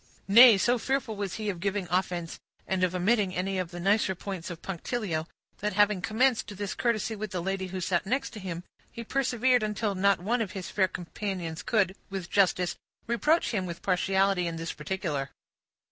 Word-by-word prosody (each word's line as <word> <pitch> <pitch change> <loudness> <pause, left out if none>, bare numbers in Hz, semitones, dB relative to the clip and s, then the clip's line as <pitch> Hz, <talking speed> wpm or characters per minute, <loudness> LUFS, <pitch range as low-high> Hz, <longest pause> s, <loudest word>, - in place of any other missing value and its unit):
Nay, 230 +2 +9
so 240 +5 +2
fearful 265 -2 -1
was 200 -2 -3
he 215 -1 -4
of 180 - -8
giving 200 0 -1
offense, 180 -2 -1 0.3
and 190 -1 0
of 185 0 +1
omitting 195 0 +2
any 190 +1 -1
of 180 -2 -2
the 175 - -8
nicer 195 +1 +2
points 190 0 -6
of 170 -2 -8
punctilio, 180 -3 -3 0.3
that 210 -1 -1
having 205 -1 +3
commenced 235 +5 +2
this 205 -1 -3
courtesy 230 -2 0
with 215 0 -5
the 185 - -3
lady 190 +1 -2
who 185 +1 -5
sat 180 +1 0
next 270 +4 -1
him, 185 -5 -6 0.3
he 235 - -7
persevered 255 0 +2
until 210 0 -1
not 200 +1 +3
one 230 +7 0
of 200 -4 -3
his 190 -3 -6
fair 190 -2 +3
companions 175 -2 -5
could, 200 -5 +1
with 190 -3 -5
justice, 180 -3 +2 0.3
reproach 300 +8 +2
him 190 -5 -1
with 170 0 -7
partiality 190 0 +2
in 165 - -3
this 165 0 -4
particular. 150 -4 -3
195 Hz, 185 wpm, -28 LUFS, 180-215 Hz, 0.3 s, Nay